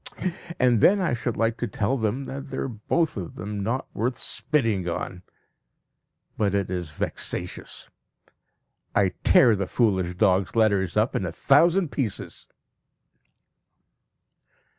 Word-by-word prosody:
And 125 -3 +4
then 200 +2 +6
I 180 -9 0
should 120 -1 -2
like 115 +1 +1
to 120 - -2
tell 110 +5 -1
them 115 +2 -1
that 135 +1 -7
they - - -5
are - - -1
both 125 +6 -1
of 90 -4 -6
them 105 -1 -5
not 115 +6 -1
worth 120 +3 -1
spitting 115 - -1
on. 90 +1 -4 1.2
But 100 -2 +1
it 100 -2 -1
is 90 -4 -4
vexatious! - - -4 1.1
I 100 -1 +4
tear 120 -4 +6
the 95 -1 -2
foolish 95 -7 +1
dog's 95 +2 +2
letters 100 -5 +2
up 110 +4 +2
in - - 0
a 85 - -3
thousand 165 - +3
pieces. 120 -9 -4
110 Hz, 135 wpm, -25 LUFS, 95-130 Hz, 1.2 s, then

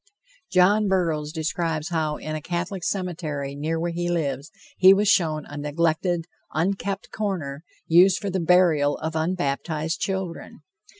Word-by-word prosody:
John 200 +3 +4
Burroughs 165 -6 0
describes 160 0 -2
how 155 -3 -1
in 155 - -6
a 155 - -4
Catholic 175 +3 -3
cemetery 160 -8 -3
near 155 +3 -2
where 170 +1 -1
he 175 +1 -2
lives 145 -4 -2 0.3
he 190 +1 +8
was 205 +1 +1
shown 155 -5 +2
a 145 - -9
neglected, 165 +3 0 0.3
unkept 195 +4 -2
corner, 170 -9 -3 0.2
used 180 +3 +5
for 200 -2 -4
the 190 - -1
burial 165 -4 +3
of 160 +1 -4
unbaptized 160 -1 -1
children. 190 -3 -4
165 Hz, 140 wpm, -24 LUFS, 155-185 Hz, 0.3 s, he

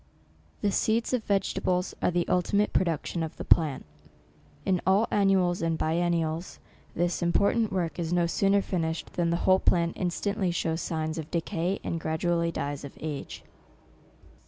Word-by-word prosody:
The 205 - +1
seeds 225 +5 +1
of 245 -3 +1
vegetables 185 -2 0
are - - +3
the 175 -1 0
ultimate 200 +3 +1
production 170 -1 0
of 160 -1 -4
the - - -6
plant. 155 -5 +3 0.8
In 185 -2 +1
all 195 +5 +3
annuals 190 -3 +2
and 165 -1 0
biennials, 165 0 -1 0.4
this 175 +2 0
important 200 +6 +2
work 175 -3 -2
is 165 -1 -2
no 175 -1 +3
sooner 195 +3 +2
finished 165 -3 -3
than 170 -1 0
the 170 - +1
whole 185 0 +5
plant 170 -2 +2
instantly 190 +2 -1
shows 165 -1 -1
signs 160 0 -2
of 155 0 -6
decay, 175 +2 -1
and 165 - -2
gradually 170 +1 0
dies 145 -3 -4
of 140 - -9
age. 150 -3 -6
175 Hz, 155 wpm, -28 LUFS, 165-190 Hz, 0.8 s, whole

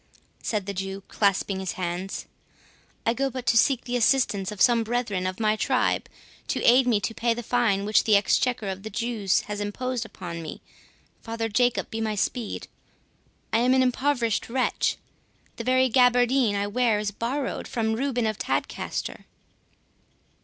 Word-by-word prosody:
said 210 -4 -2
the 200 - -4
Jew, 195 +1 -5
clasping 200 -1 +1
his 190 -2 -3
hands; 180 +1 -4 0.8
"I 230 - +3
go 275 +2 0
but 255 -1 -6
to 230 - +3
seek 250 +2 +3
the 245 - -3
assistance 225 -5 +2
of 210 - -8
some 235 -1 +5
brethren 220 -5 -1
of 185 +2 -4
my 215 -1 +2
tribe 255 +3 0 0.4
to - - -2
aid 250 +1 +6
me 225 -4 +3
to 225 - -2
pay 230 +1 0
the 240 - -5
fine 225 -5 +1
which 210 +1 +3
the 215 - +4
Exchequer 215 +2 +2
of 190 0 -4
the 220 - -6
Jews 220 -3 0
have 210 0 -5
imposed 245 +4 -2
upon 175 -6 -7
me—Father 225 +7 -8
Jacob 245 +3 +1
be 225 - -3
my 215 -1 -1
speed! 225 +2 -2 0.9
I 225 - +4
am 250 +2 +3
an 260 - +4
impoverished 250 -4 0
wretch—the 250 -1 -3
very 255 +1 +3
gaberdine 245 -2 +3
I 200 0 0
wear 225 +1 +1
is 210 -1 -2
borrowed 255 +6 -3
from 220 -2 -1
Reuben 245 0 -1
of 215 -1 -2
Tadcaster." - - -3
225 Hz, 160 wpm, -25 LUFS, 205-245 Hz, 0.9 s, aid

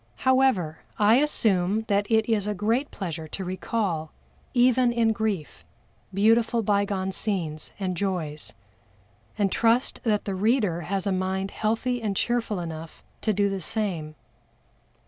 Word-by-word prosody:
However, 255 -12 +3 0.2
I 215 +3 +5
assume 215 -8 +2
that 205 -2 0
it 220 -1 +3
is 210 -3 +1
a 210 - -1
great 225 +8 0
pleasure 165 -5 -5
to 190 +4 -6
recall, 185 -4 -2 0.4
even 250 0 +4
in 230 -2 +2
grief, 210 -8 -3 0.5
beautiful 225 +3 +3
bygone 200 -2 0
scenes 175 -7 -3
and 185 -2 -1
joys, 170 -6 -3 0.8
and 200 -3 +1
trust 235 +2 +2
that 215 -4 +1
the 195 - -2
reader 205 -3 +1
has 190 +2 -2
a 200 - +1
mind 190 +1 -1
healthy 230 +3 -1
and 205 -3 -2
cheerful 235 -5 0
enough 165 -1 -7 0.2
to 220 - +1
do 205 0 +2
the 195 -1 -3
same. 170 -6 -3
205 Hz, 140 wpm, -26 LUFS, 185-225 Hz, 0.8 s, I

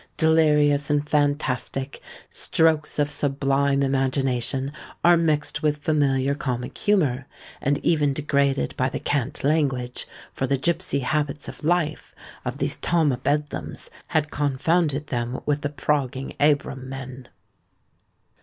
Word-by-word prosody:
Delirious 150 -3 +4
and 145 0 +1
fantastic, 145 -2 -1 0.3
strokes 160 -2 +1
of 145 -1 +1
sublime 140 -1 +1
imagination 135 0 0 0.3
are 175 0 +7
mixed 155 -3 0
with 150 -1 +1
familiar 140 -3 +1
comic 125 -4 -4
humour, 145 -11 +1 0.3
and 140 +1 +1
even 150 -4 +3
degraded 140 -1 0
by 130 +1 +1
the - - -4
cant 140 -1 -2
language; 135 -5 0 0.3
for 135 - -2
the 140 - +1
gipsy 170 0 +1
habits 145 +2 -1
of - - -9
life 160 -1 0 0.3
of - - -4
these - - -2
"Tom 165 -4 +2
o' 125 - -1
Bedlams" 145 +3 -2 0.2
had 155 -1 0
confounded 145 +1 +1
them 120 -2 -3
with 145 0 0
"the 145 - -1
progging 140 -3 -1
Abram 140 -3 +1
men." 130 -1 -8
145 Hz, 125 wpm, -24 LUFS, 135-150 Hz, 0.3 s, are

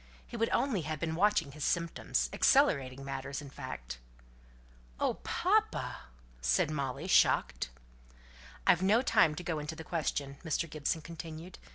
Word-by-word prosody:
He - - -10
would 230 0 +1
only 245 -10 +1
have 155 0 -4
been 160 0 -2
watching 170 -4 +2
his 150 +1 -7
symptoms 170 0 0
accelerating 135 - +3
matters, 135 0 -4
in 145 -2 -9
fact." - - -7 1.0
"Oh, - - 0
papa!" - - 0 0.4
said 60 - +2
Molly, 140 0 -3
shocked. 185 - +3 1.0
"I've 175 - +5
no 210 +6 +4
time 155 -10 +4
to 180 - -6
go 165 -3 -2
into 150 +2 -5
the 160 - -8
question," 145 -4 -2
Mr. 165 +1 -1
Gibson 155 +1 -2
continued. 165 +1 -8
155 Hz, 145 wpm, -32 LUFS, 140-175 Hz, 1.0 s, I've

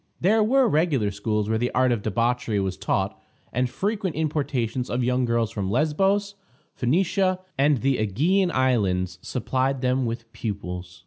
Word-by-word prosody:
There 215 +5 +3
were 260 +3 +4
regular 150 - +1
schools 105 +1 -1
where 110 0 0
the 120 +1 0
art 130 0 +3
of 115 -4 0
debauchery 115 0 0
was 95 -1 -1
taught, - - -2 0.3
and 125 +1 +1
frequent 200 - -2
importations 135 -6 -1
of 125 +1 -1
young 125 +1 +1
girls 115 -2 0
from 100 -5 -3
Lesbos, 195 - +1 0.4
Phoenicia, 185 +7 +1 0.2
and 140 -2 +2
the 135 -1 +2
Ægean 160 - +2
Islands 95 - +1
supplied 130 +1 -1
them 130 -1 +1
with 115 0 -5
pupils. 90 -5 -5
125 Hz, 150 wpm, -24 LUFS, 110-155 Hz, 0.4 s, were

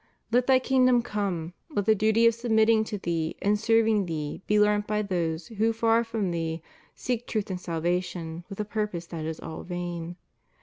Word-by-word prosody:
Let 245 +2 +3
Thy 265 -1 +6
kingdom 255 -2 +3
come; 190 -7 -3 0.2
let 205 -11 -1
the 220 - +5
duty 220 +2 +3
of 230 - +6
submitting 220 -1 +3
to 215 -1 -4
Thee 165 -4 -2
and 205 +1 +1
serving 225 -3 +3
Thee 155 -1 -4
be 210 0 +3
learnt 210 0 +3
by 210 0 0
those 170 -4 -2
who, 225 0 +1
far 225 +1 +3
from 220 -5 -2
Thee, 165 -1 -3 0.3
seek 245 -1 -3
truth 210 -3 -2
and 180 -1 -4
salvation 170 0 -2
with 195 - -8
a 210 - -1
purpose 210 -5 -3
that 165 -2 -6
is 160 0 -4
all 160 -1 -7
vain. 175 -1 -5
205 Hz, 185 wpm, -27 LUFS, 170-225 Hz, 0.3 s, Thy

